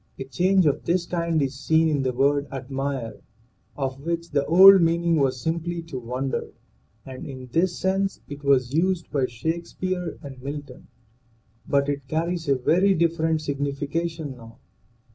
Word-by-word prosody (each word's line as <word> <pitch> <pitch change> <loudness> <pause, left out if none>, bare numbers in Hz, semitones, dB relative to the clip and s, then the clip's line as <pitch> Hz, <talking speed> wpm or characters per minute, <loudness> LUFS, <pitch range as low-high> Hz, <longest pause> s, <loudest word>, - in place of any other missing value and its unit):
A - - -4
change 185 +7 +2
of 145 - +1
this 175 +1 +1
kind 170 -2 -1
is 135 0 -2
seen 160 +3 +3
in 150 -3 +1
the 130 -1 0
word 140 +3 +1
admire, 135 -2 -4 0.6
of 135 -1 -3
which 170 +2 -3
the 140 -2 +1
old 190 +3 +9
meaning 170 0 +2
was 135 -3 +1
simply 170 +3 -3
to 160 -6 -6
wonder, 125 +3 -3 0.6
and 130 -1 -8
in 130 -2 -9
this 170 +5 +1
sense 195 +1 0
it 145 0 -9
was 135 -2 +2
used 175 +2 0
by 135 -3 +1
Shake 160 +8 -3
speare 185 -2 -4
and 135 -3 -9
Milton. 140 -1 -8 0.8
But 140 0 +2
it 140 -1 -3
carries 165 +1 -2
a 140 - +4
very 185 +9 +3
different 160 -1 +1
sig 145 -2 -4
nification 145 +1 -3
now. 115 -2 -14
150 Hz, 160 wpm, -24 LUFS, 135-170 Hz, 0.8 s, old